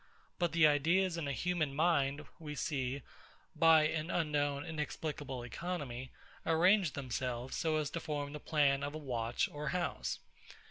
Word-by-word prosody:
But 175 -2 +1
the 170 -2 +6
ideas 165 +5 +3
in 165 -4 -3
a - - -1
human 155 -1 -1
mind, 150 -3 +2
we 150 -2 -6
see, 135 -2 -2 0.5
by 165 -1 +6
an 155 +1 -1
unknown, 145 -4 0
inexplicable 150 -4 -4
economy, 130 -2 -4 0.3
arrange 175 +1 +4
themselves 125 -2 -3
so 160 -1 +1
as 150 -2 -1
to 165 - -2
form 145 -2 -3
the 150 - -5
plan 145 -3 +2
of 145 +1 -3
a - - -2
watch 120 -5 -1
or 150 0 -5
house. 180 -1 -1
150 Hz, 150 wpm, -34 LUFS, 140-165 Hz, 0.5 s, the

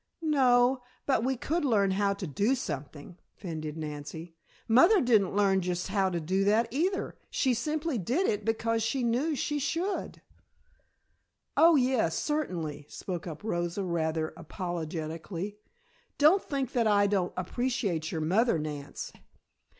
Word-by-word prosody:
"No, 255 -4 +4 0.2
but 260 -5 +2
we 260 +1 0
could 325 +7 -1
learn 205 -8 +3
how 200 +1 +1
to 195 - -5
do 200 - +1
something," 150 - -6 0.2
fended 155 -4 -6
Nancy. 155 +2 -6 0.3
"Mother 340 - +6
didn't 220 - +3
learn 195 -2 +3
just 180 0 -2
how 195 -1 +2
to 175 -2 -2
do 185 +5 0
that 215 +3 +3
either, 355 +9 -1
she 260 -2 +1
simply 300 +2 -1
did 255 - 0
it 210 - 0
because 225 +1 0
she 230 +4 0
knew 255 +7 +1
she 295 +2 -1
should." 335 +7 -2 1.3
"Oh, 330 0 +6
yes, 250 - +2
certainly," 175 - -2
spoke 180 -2 -5
up 160 +3 -7
Rosa 175 -2 -2
rather 160 -3 -1
apologetically. 170 +2 -5 0.6
"Don't 315 +7 +5
think 275 -4 -2
that 235 -3 +2
I 205 -1 +4
don't 195 -3 +1
appreciate 185 -5 -1
your 160 - -2
mother, 195 +6 +2
Nance. 150 -2 -6
205 Hz, 140 wpm, -29 LUFS, 170-260 Hz, 1.3 s, Mother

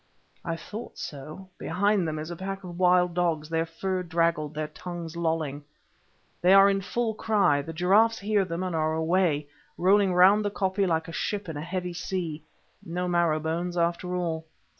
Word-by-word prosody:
I 165 -2 -2
thought 210 +7 -8
so—behind 180 +6 -2
them 155 0 -3
is 155 +2 -5
a - - -4
pack 195 +2 -5
of 175 -1 -8
wild 180 -1 +4
dogs, 165 -3 0
their 165 0 0
fur 185 +3 -2
draggled, 165 -3 0
their 155 0 -3
tongues 170 0 -7
lolling. 160 -4 -2 0.8
They 185 +2 +6
are 195 0 +7
in 195 0 0
full 225 +3 -1
cry; 205 -10 +2
the 160 - -7
giraffes 195 +7 +3
hear 205 0 +1
them 175 0 -4
and 180 -2 -2
are 155 0 +1
away, 160 -2 +1 0.3
rolling 195 +1 +4
round 195 +4 +6
the 205 - 0
koppie 195 -1 0
like 160 -2 0
a - - -7
ship 205 +4 -3
in 160 - -5
a 145 - -4
heavy 180 +1 -4
sea. 170 -3 -4 0.4
No 180 +2 -3
marrow 170 -3 +2
bones 170 +3 -2
after 170 +1 0
all. 165 -3 -2
175 Hz, 180 wpm, -27 LUFS, 160-190 Hz, 0.8 s, are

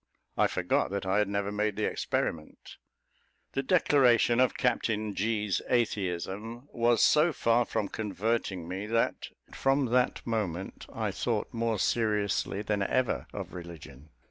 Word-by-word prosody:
I - - +3
forgot - - 0
that 100 0 -3
I 95 +2 +2
had 105 - +2
never 100 0 -2
made 105 0 -1
the - - -1
experiment. 75 -2 -3 0.7
The 135 - -1
declaration 130 -6 +4
of 130 -1 +3
Captain 110 -4 0
G.'s 105 -3 0
atheism 105 - -2
was 120 0 +3
so 155 +3 +5
far 120 -4 +2
from 105 - -2
converting 100 -3 -2
me, 95 +4 -4
that 115 +1 0 0.3
from 135 +1 +2
that 125 0 +1
moment 95 -6 -3
I - - -2
thought - - -2
more 115 -1 0
seriously 105 -1 0
than 105 -1 -1
ever 125 +5 0
of - - -7
religion. 80 -5 -10
105 Hz, 140 wpm, -29 LUFS, 95-120 Hz, 0.7 s, so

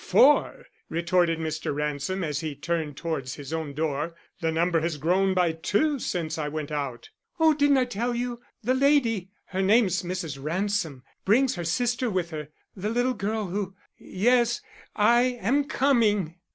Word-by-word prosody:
"Four!" 290 +3 +4 0.2
retorted 170 0 +1
Mr. 155 -2 -3
Ransom 150 +6 -2
as 150 -3 -2
he 155 -3 -4
turned 155 -1 -3
towards 150 -7 -3
his 145 +2 -8
own 155 -3 -3
door. 155 +2 -2 0.2
"The 165 -1 0
number 165 +1 +2
has 165 -1 -1
grown 185 +5 +2
by 180 -2 +3
two 210 - 0
since 165 -7 -3
I 150 - -1
went 155 0 -4
out." 140 -5 -4 0.3
"Oh, 320 -1 +6
I - - 0
didn't 280 -4 +3
tell 240 +3 -1
you. 240 0 -3 0.2
The 250 +4 +2
lady 260 -8 +2 0.2
her 190 0 -1
name's 195 -2 +3
Mrs. 175 -6 -4
Ransom 165 -4 -1 0.2
brings 250 +6 +3
her 175 - -4
sister 240 +8 0
with 180 -4 -2
her. 150 -2 -5 0.3
The 200 +2 -3
little 245 +3 +1
girl 215 -1 -2
who 195 +1 -3 0.2
yes, 240 +4 +2 0.4
I 240 +4 +3
am 280 +5 +1
coming." 230 - +2
185 Hz, 165 wpm, -26 LUFS, 160-240 Hz, 0.4 s, Oh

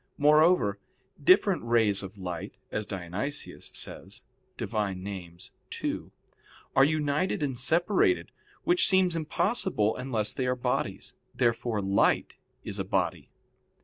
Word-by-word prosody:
Moreover, 150 - +4 0.4
different 185 +3 +5
rays 115 -4 +3
of 95 +1 -9
light, 90 +1 -5 0.2
as 110 -1 -3
Dionysius 95 - -5
says - - -5 0.3
(Div. - - -5
Nom. 95 -4 -3 0.5
ii) - - -1 0.7
are 135 - +7
united 150 +3 +1
and 135 -3 -1
separated, 175 - +2 0.3
which 355 +1 +3
seems 190 -3 +3
impossible 160 - 0
unless 115 -5 -1
they 130 - -2
are 125 - +1
bodies. 125 - -2 0.2
Therefore 115 -3 0
light 95 +1 +2 0.3
is - - -5
a - - 0
body. - - -1
125 Hz, 115 wpm, -28 LUFS, 100-155 Hz, 0.7 s, are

